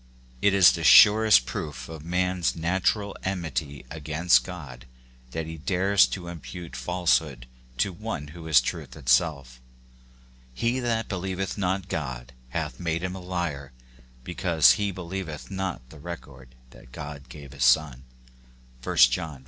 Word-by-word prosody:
It 100 Hz, -1 st, +3 dB
is 95 Hz, -3 st, +8 dB
the 85 Hz, -, -4 dB
surest 105 Hz, -2 st, +7 dB
proof 65 Hz, -4 st, -6 dB
of 80 Hz, -2 st, -9 dB
a -, -, -14 dB
man's 90 Hz, 0 st, 0 dB
natural 95 Hz, +4 st, 0 dB
enmity 80 Hz, -7 st, -4 dB
against 80 Hz, +2 st, +2 dB
God 70 Hz, -11 st, -9 dB, 0.4 s
that 80 Hz, +4 st, -4 dB
he 80 Hz, 0 st, -8 dB
dares 95 Hz, +4 st, +3 dB
to 95 Hz, -, -6 dB
imoute 85 Hz, -2 st, -9 dB
falsehood 75 Hz, -2 st, 0 dB, 0.3 s
to 95 Hz, +9 st, 0 dB
one 85 Hz, -7 st, -6 dB
who 80 Hz, +1 st, -10 dB
is 75 Hz, -5 st, +6 dB
truth -, -, -5 dB
itself. 65 Hz, -2 st, 0 dB, 0.9 s
"He 120 Hz, -, 0 dB
that 115 Hz, -2 st, -1 dB
believeth 95 Hz, 0 st, -3 dB
not 95 Hz, -1 st, -2 dB
God 65 Hz, -7 st, -5 dB, 0.2 s
hath -, -, -4 dB
made 85 Hz, 0 st, -2 dB
him 90 Hz, 0 st, -3 dB
a 95 Hz, -, -7 dB
liar; 85 Hz, -7 st, -4 dB, 0.5 s
be 90 Hz, -, -7 dB
cause 85 Hz, -4 st, +4 dB
he 105 Hz, -1 st, 0 dB
believeth 95 Hz, -3 st, -6 dB
not 95 Hz, -10 st, -4 dB
the 80 Hz, -, -13 dB
record 70 Hz, -6 st, -10 dB, 0.2 s
that 60 Hz, -, -17 dB
God 70 Hz, 0 st, -9 dB
gave 70 Hz, -2 st, -11 dB
of 70 Hz, -, -14 dB
his -, -, +1 dB
Son." 65 Hz, 0 st, +3 dB, 0.8 s
(i -, -, -3 dB
John 65 Hz, +5 st, +4 dB
v. -, -, -14 dB
80 Hz, 155 wpm, -26 LUFS, 70-95 Hz, 0.9 s, is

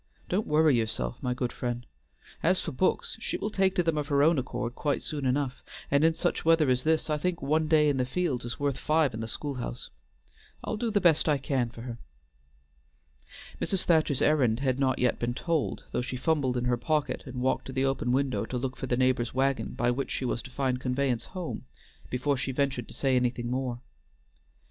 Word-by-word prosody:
"Don't 200 Hz, +4 st, 0 dB
worry 155 Hz, -2 st, +4 dB
yourself, 110 Hz, -, -2 dB
my 125 Hz, -1 st, -1 dB
good 125 Hz, -2 st, -2 dB
friend. 120 Hz, -1 st, -3 dB, 0.6 s
As 180 Hz, +3 st, +3 dB
for 165 Hz, -, -3 dB
books, 185 Hz, +10 st, 0 dB
she -, -, -3 dB
will 210 Hz, -, -3 dB
take 190 Hz, -2 st, +2 dB
to 180 Hz, -, +3 dB
them 165 Hz, -2 st, +1 dB
of 145 Hz, -, -3 dB
her 140 Hz, -1 st, +3 dB
own 160 Hz, -1 st, +4 dB
accord 120 Hz, -1 st, -3 dB
quite 145 Hz, +2 st, -1 dB
soon 145 Hz, -4 st, -2 dB
enough, 135 Hz, 0 st, -1 dB, 0.3 s
and 140 Hz, +2 st, +4 dB
in 165 Hz, 0 st, +4 dB
such -, -, -1 dB
weather 160 Hz, -4 st, +4 dB
as 125 Hz, 0 st, +1 dB
this 160 Hz, 0 st, +2 dB
I 150 Hz, -1 st, 0 dB
think 180 Hz, +2 st, -1 dB
one 155 Hz, +3 st, +1 dB
day 155 Hz, -1 st, +5 dB
in 145 Hz, -2 st, +2 dB
the 130 Hz, -, +2 dB
fields 145 Hz, -3 st, -1 dB
is 120 Hz, 0 st, -5 dB
worth 140 Hz, -2 st, 0 dB
five 155 Hz, -4 st, +2 dB
in 110 Hz, -, -5 dB
the 110 Hz, -, -3 dB
school 145 Hz, +5 st, -3 dB
house. 120 Hz, -, -6 dB, 0.7 s
I'll -, -, -2 dB
do 230 Hz, +1 st, -1 dB
the 210 Hz, -1 st, +2 dB
best 160 Hz, -4 st, +4 dB
I 150 Hz, -, +4 dB
can 135 Hz, -3 st, -1 dB
for 115 Hz, 0 st, -10 dB
her." 120 Hz, -2 st, -6 dB, 1.6 s
Mrs. 195 Hz, -, +1 dB
Thacher's 155 Hz, -5 st, +2 dB
errand 130 Hz, -6 st, +3 dB
had 130 Hz, -1 st, +1 dB
not 130 Hz, -1 st, +2 dB
yet 125 Hz, -1 st, +1 dB
been 120 Hz, 0 st, -1 dB
told, 160 Hz, 0 st, -1 dB
though -, -, 0 dB
she 125 Hz, +1 st, -4 dB
fumbled 130 Hz, -2 st, +1 dB
in 125 Hz, -, -1 dB
her 125 Hz, 0 st, +2 dB
pocket 150 Hz, +4 st, 0 dB
and 130 Hz, -, -7 dB
walked 130 Hz, +1 st, 0 dB
to -, -, -6 dB
the 130 Hz, +1 st, 0 dB
open 135 Hz, -2 st, 0 dB
window 135 Hz, 0 st, +1 dB
to 125 Hz, -, -3 dB
look 130 Hz, +1 st, -3 dB
for 130 Hz, -, -4 dB
the 120 Hz, -, +1 dB
neighbor's 130 Hz, -2 st, +1 dB
wagon 135 Hz, -3 st, 0 dB
by 120 Hz, +1 st, +2 dB
which 135 Hz, +3 st, -2 dB
she 130 Hz, -, -2 dB
was 120 Hz, -, -1 dB
to -, -, -10 dB
find 130 Hz, -1 st, -1 dB
conveyance 125 Hz, -2 st, 0 dB
home, 180 Hz, -7 st, -6 dB, 0.4 s
before 135 Hz, +3 st, 0 dB
she 130 Hz, -, -2 dB
ventured 135 Hz, -2 st, -1 dB
to -, -, -9 dB
say 135 Hz, -2 st, +1 dB
anything 125 Hz, -1 st, 0 dB
more. 125 Hz, -2 st, -2 dB
135 Hz, 220 wpm, -28 LUFS, 125-155 Hz, 1.6 s, day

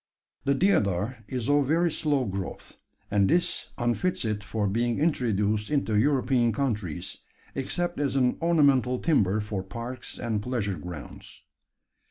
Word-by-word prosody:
The 140 Hz, -, +3 dB
deodar 110 Hz, -, +1 dB
is 125 Hz, -3 st, -3 dB
of 145 Hz, -1 st, +3 dB
very 165 Hz, +3 st, +2 dB
slow 145 Hz, -4 st, +1 dB
growth; 95 Hz, -3 st, -5 dB, 0.4 s
and 100 Hz, -1 st, +3 dB
this 175 Hz, +2 st, +1 dB
unfits 120 Hz, +7 st, 0 dB
it 105 Hz, -1 st, -2 dB
for 105 Hz, +1 st, -2 dB
being 115 Hz, +4 st, 0 dB
introduced 110 Hz, -9 st, +1 dB
into 140 Hz, -7 st, 0 dB
European 125 Hz, 0 st, +3 dB
countries 100 Hz, -, -2 dB, 0.4 s
except 175 Hz, +6 st, -2 dB
as 140 Hz, -2 st, 0 dB
an 125 Hz, -2 st, +2 dB
ornamental 140 Hz, -7 st, +3 dB
timber 110 Hz, -, +2 dB
for 105 Hz, -2 st, -3 dB
parks 115 Hz, +7 st, -7 dB
and 115 Hz, -4 st, -2 dB
pleasure 105 Hz, -7 st, -2 dB
grounds. 85 Hz, -2 st, -9 dB
120 Hz, 135 wpm, -27 LUFS, 105-140 Hz, 0.4 s, The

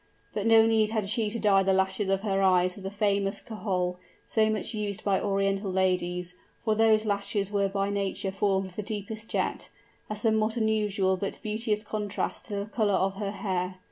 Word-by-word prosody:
But 210 Hz, +1 st, -1 dB
no 225 Hz, -1 st, +7 dB
need 220 Hz, -1 st, +3 dB
had 215 Hz, -3 st, -1 dB
she 220 Hz, 0 st, +1 dB
to 230 Hz, -, -3 dB
dye 205 Hz, -3 st, +4 dB
the 190 Hz, 0 st, +2 dB
lashes 190 Hz, +1 st, +1 dB
of 195 Hz, 0 st, +1 dB
her 195 Hz, -2 st, 0 dB
eyes 185 Hz, -1 st, +4 dB
with 195 Hz, -, -10 dB
the -, -, -2 dB
famous 200 Hz, -1 st, 0 dB
kohol, 185 Hz, -5 st, -2 dB, 0.3 s
so 220 Hz, -1 st, +2 dB
much 215 Hz, +2 st, 0 dB
used 205 Hz, -2 st, -3 dB
by 195 Hz, -2 st, +1 dB
Oriental 195 Hz, 0 st, 0 dB
ladies, 180 Hz, -1 st, 0 dB, 0.3 s
for 220 Hz, -, +3 dB
those 220 Hz, 0 st, +4 dB
lashes 200 Hz, -1 st, -1 dB
were 200 Hz, -1 st, +2 dB
by 195 Hz, 0 st, -1 dB
nature 200 Hz, 0 st, -2 dB
formed 195 Hz, -1 st, 0 dB
of -, -, -18 dB
the -, -, -3 dB
deepest 215 Hz, +1 st, -5 dB
jet -, -, -2 dB, 0.4 s
a 215 Hz, -, -2 dB
somewhat 220 Hz, +1 st, +1 dB
unusual 210 Hz, -4 st, +1 dB
but 195 Hz, +1 st, -3 dB
beauteous 215 Hz, 0 st, -1 dB
contrast 210 Hz, +1 st, -3 dB
with 200 Hz, -1 st, -2 dB
the 210 Hz, -, -18 dB
color 210 Hz, -4 st, +2 dB
of 195 Hz, 0 st, 0 dB
her 205 Hz, -1 st, -2 dB
hair. 190 Hz, -2 st, -2 dB
200 Hz, 195 wpm, -28 LUFS, 195-215 Hz, 0.4 s, no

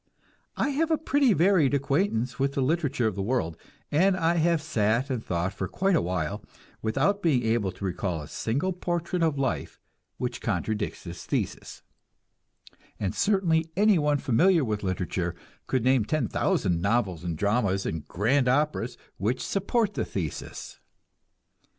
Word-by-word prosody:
I -, -, +1 dB
have 310 Hz, +3 st, 0 dB
a 320 Hz, -, +3 dB
pretty 285 Hz, -4 st, +2 dB
varied 170 Hz, -7 st, +4 dB
acquaintance 140 Hz, -, 0 dB
with 135 Hz, +1 st, +1 dB
the 140 Hz, -, 0 dB
literature 145 Hz, -3 st, +1 dB
of 110 Hz, -, +1 dB
the 100 Hz, -, -4 dB
world, 95 Hz, -7 st, -1 dB, 0.4 s
and 185 Hz, +5 st, +3 dB
I 170 Hz, 0 st, +2 dB
have 170 Hz, 0 st, +3 dB
sat 120 Hz, -3 st, 0 dB
and 120 Hz, -4 st, -2 dB
thought 90 Hz, +2 st, -1 dB
for 95 Hz, -1 st, -3 dB
quite 195 Hz, -, +1 dB
a -, -, +3 dB
while, 85 Hz, -3 st, -2 dB, 0.4 s
without 140 Hz, -, +1 dB
being 145 Hz, -9 st, +2 dB
able 110 Hz, -4 st, +1 dB
to 100 Hz, -, -7 dB
recall 90 Hz, -2 st, -2 dB
a -, -, -9 dB
single 140 Hz, -, -1 dB
portrait 175 Hz, 0 st, -2 dB
of 160 Hz, -3 st, +2 dB
life 135 Hz, -1 st, -2 dB, 0.4 s
which -, -, -3 dB
contradicts 110 Hz, -1 st, -2 dB
this 85 Hz, -1 st, -8 dB
thesis; -, -, -3 dB, 1.2 s
and 95 Hz, -3 st, -1 dB
certainly 170 Hz, -6 st, +2 dB
anyone 170 Hz, -9 st, +4 dB
familiar 160 Hz, +5 st, +3 dB
with 105 Hz, -2 st, -2 dB
literature 90 Hz, -2 st, -2 dB, 0.3 s
could 130 Hz, -3 st, 0 dB
name 130 Hz, -2 st, +4 dB
ten 135 Hz, +2 st, 0 dB
thousand 85 Hz, -2 st, 0 dB
novels 100 Hz, -5 st, 0 dB
and 85 Hz, -3 st, -3 dB
dramas 100 Hz, -1 st, +1 dB
and 80 Hz, -2 st, -4 dB
grand 125 Hz, +8 st, +1 dB
operas 150 Hz, +4 st, +1 dB, 0.2 s
which 115 Hz, +7 st, -1 dB
support 205 Hz, +2 st, 0 dB
the -, -, -1 dB
thesis. -, -, -5 dB
130 Hz, 155 wpm, -27 LUFS, 100-170 Hz, 1.2 s, varied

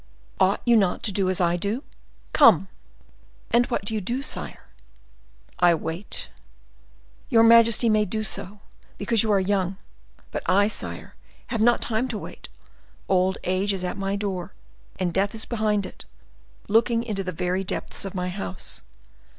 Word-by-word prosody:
Ought 195 Hz, -, +2 dB
you 240 Hz, -1 st, +5 dB
not 195 Hz, -5 st, +2 dB
to 210 Hz, -, +1 dB
do 190 Hz, -1 st, +1 dB
as 185 Hz, -, +1 dB
I 175 Hz, -1 st, +2 dB
do? 210 Hz, -, -2 dB, 0.5 s
Come!" 195 Hz, -, +6 dB, 0.8 s
"And 240 Hz, +1 st, +4 dB
what 235 Hz, -, -2 dB
do 220 Hz, -, -4 dB
you 215 Hz, -, -1 dB
do, 245 Hz, +8 st, -3 dB
sire?" -, -, -4 dB, 1.0 s
"I 175 Hz, -1 st, +5 dB
wait." 165 Hz, +4 st, -5 dB, 1.0 s
"Your 225 Hz, -1 st, +5 dB
majesty 230 Hz, 0 st, +6 dB
may 215 Hz, -1 st, +3 dB
do 215 Hz, +3 st, -2 dB
so, 205 Hz, -1 st, -4 dB, 0.4 s
because 215 Hz, +1 st, +3 dB
you 220 Hz, -, +1 dB
are 200 Hz, -, +4 dB
young; 190 Hz, -1 st, 0 dB, 0.5 s
but -, -, -3 dB
I, 200 Hz, +2 st, +4 dB
sire, -, -, -6 dB, 0.4 s
have 225 Hz, -, 0 dB
not 240 Hz, +1 st, +4 dB
time 230 Hz, +2 st, -1 dB
to 235 Hz, -4 st, -4 dB
wait; -, -, -9 dB, 0.6 s
old 190 Hz, 0 st, +2 dB
age 185 Hz, +3 st, 0 dB
is 190 Hz, -2 st, -4 dB
at 180 Hz, -, -2 dB
my 195 Hz, 0 st, -2 dB
door, 195 Hz, -3 st, -3 dB, 0.4 s
and 175 Hz, -2 st, -1 dB
death 200 Hz, +4 st, 0 dB
is 220 Hz, -, -5 dB
behind 215 Hz, -3 st, 0 dB
it, -, -, -11 dB, 0.6 s
looking 230 Hz, +2 st, +2 dB
into 210 Hz, -4 st, -3 dB
the 185 Hz, -, -3 dB
very 180 Hz, +3 st, -1 dB
depths 190 Hz, -, -4 dB
of 195 Hz, 0 st, -6 dB
my 180 Hz, 0 st, -2 dB
house. 190 Hz, 0 st, -5 dB
200 Hz, 165 wpm, -24 LUFS, 185-220 Hz, 1.0 s, Come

